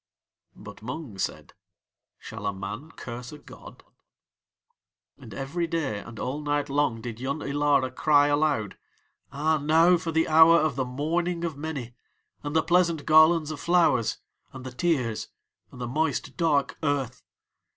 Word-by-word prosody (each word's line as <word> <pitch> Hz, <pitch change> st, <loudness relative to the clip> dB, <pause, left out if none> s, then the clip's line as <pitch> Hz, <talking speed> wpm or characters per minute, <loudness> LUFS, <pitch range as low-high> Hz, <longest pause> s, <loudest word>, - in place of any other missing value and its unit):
But 100 Hz, 0 st, -12 dB
Mung 125 Hz, -3 st, -7 dB
said: -, -, -4 dB, 0.6 s
"Shall 110 Hz, -2 st, -7 dB
a 100 Hz, -, -1 dB
man 100 Hz, +10 st, -7 dB
curse 125 Hz, -5 st, -8 dB
a 150 Hz, -, -9 dB
god?" 145 Hz, -, -14 dB, 1.4 s
And -, -, -12 dB
every 165 Hz, +6 st, -3 dB
day 150 Hz, -11 st, -2 dB
and 115 Hz, +2 st, -11 dB
all 135 Hz, +4 st, -3 dB
night 145 Hz, -1 st, -1 dB
long 140 Hz, -5 st, 0 dB
did 115 Hz, -2 st, -7 dB
Yun 140 Hz, +4 st, -3 dB
Ilara 140 Hz, -2 st, +1 dB
cry 145 Hz, +2 st, +4 dB
aloud: 145 Hz, -8 st, 0 dB, 0.5 s
"Ah, 155 Hz, +3 st, +1 dB
now 165 Hz, +4 st, +4 dB
for 165 Hz, 0 st, -4 dB
the 160 Hz, 0 st, +1 dB
hour 160 Hz, +1 st, +7 dB
of 155 Hz, -2 st, +1 dB
the 130 Hz, -, -1 dB
mourning 170 Hz, +7 st, -2 dB
of 165 Hz, -3 st, -3 dB
many, 140 Hz, -5 st, -6 dB, 0.5 s
and 145 Hz, +1 st, -5 dB
the 160 Hz, -, +3 dB
pleasant 170 Hz, -2 st, +2 dB
garlands 155 Hz, 0 st, +5 dB
of 150 Hz, -, -6 dB
flowers 170 Hz, -8 st, +2 dB, 0.4 s
and 130 Hz, -1 st, -9 dB
the 130 Hz, -, -6 dB
tears, 125 Hz, -6 st, -1 dB, 0.4 s
and 125 Hz, -, -13 dB
the 125 Hz, -, -3 dB
moist, 150 Hz, +2 st, -2 dB
dark 150 Hz, -5 st, 0 dB
earth. 135 Hz, -5 st, -1 dB
145 Hz, 150 wpm, -26 LUFS, 125-160 Hz, 1.4 s, hour